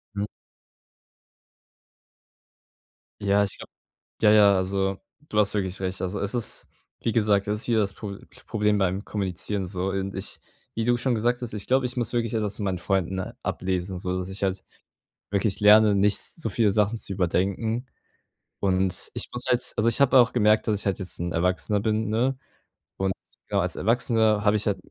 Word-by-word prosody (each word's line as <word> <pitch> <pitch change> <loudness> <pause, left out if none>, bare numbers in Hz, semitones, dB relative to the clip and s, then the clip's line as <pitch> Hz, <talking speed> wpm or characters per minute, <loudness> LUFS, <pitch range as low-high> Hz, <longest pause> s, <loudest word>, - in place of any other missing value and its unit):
Mhm. 100 0 -1 3.0
Ja, 100 0 +3
ich 100 - -5
glaube - - -11 0.5
ja, 105 -1 +6
ja, 100 -2 +6
also, 95 +1 -1 0.3
du 105 - -3
hast 105 -1 +3
wirklich 95 -2 -2
recht. 95 0 -3
Also 95 +2 -2
es 100 +2 -2
ist 120 -3 -1 0.3
wie 115 - -1
gesagt, 105 -3 +2
es 105 0 0
ist - - -3
hier 115 -2 +1
das 100 -3 +1
Pro 100 -2 -7 0.3
Problem 105 -2 +1
beim 95 +1 0
Kommunizieren 95 -1 -2
so 95 0 -2
und 95 0 -3
ich - - -5 0.4
wie 115 - -1
du 120 0 +3
schon 125 +1 0
gesagt 120 +3 0
hast, 120 -3 -5
ich 105 - -6
glaube, 130 0 +3
ich 125 - -3
muss 120 -1 -1
wirklich 115 -1 0
etwas 105 -3 -1
von 105 - -3
meinen 95 -2 -1
Freunden 95 -1 -1 0.2
ablesen, 95 0 -2
so, 90 0 -2
dass 90 +1 -4
ich 100 +1 -3
halt 95 0 -1 0.7
wirklich 100 0 0
lerne, 105 0 +7
nicht 100 +1 +3
so 140 -9 -3
viele 105 0 +2
Sachen 105 +2 +1
zu 100 - -3
überdenken. 100 +6 0 0.8
Und 95 -1 +1
ich - - -3
muss 125 0 0
halt 125 0 +1
also 110 +2 +2
ich 115 - 0
habe 135 -1 +6
auch 120 -1 +5
gemerkt, 110 -2 +3
dass 105 -2 +1
ich 105 - -6
halt 95 -1 0
jetzt 95 -2 -4
'n 85 0 -3
Erwachsener 90 +4 0
bin, 110 0 0
ne? 125 +4 +1 0.6
Und 95 0 0 0.4
ja, - - +1
als - - -1
Erwachsener 110 -1 +2
habe 105 +1 +4
ich 105 - -1
halt 100 - +1
105 Hz, 190 wpm, -25 LUFS, 95-110 Hz, 3.0 s, lerne